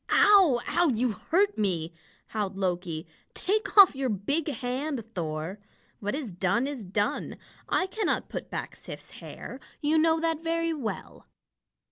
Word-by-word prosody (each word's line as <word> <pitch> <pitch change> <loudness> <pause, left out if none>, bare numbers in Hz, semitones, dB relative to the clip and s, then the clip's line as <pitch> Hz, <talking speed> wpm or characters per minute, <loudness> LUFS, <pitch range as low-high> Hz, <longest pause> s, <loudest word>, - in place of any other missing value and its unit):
"Ow 380 -12 +6
ow! 350 0 +3
You 245 -1 +1
hurt 385 - +1
me!" 170 -5 0 0.4
howled 200 -3 -3
Loki. 175 -4 -2 0.3
"Take 425 +3 -1
off 390 -7 +10
your 265 -1 -1
big 280 - -1
hand, 270 -1 -2
Thor. 165 +2 -3 0.4
What 205 +3 -2
is 275 -8 -4
done, 190 +7 +1
is 275 -5 -4
done. 205 +2 -1 0.3
I 370 - +2
cannot 425 +3 -1
put - - -6
back - - -5
Sif's - - -10
hair. - - -8 0.2
You 310 +1 +3
know 320 0 +4
that 325 -1 -1
very 330 0 0
well." 260 -9 -6
255 Hz, 145 wpm, -28 LUFS, 200-325 Hz, 0.4 s, off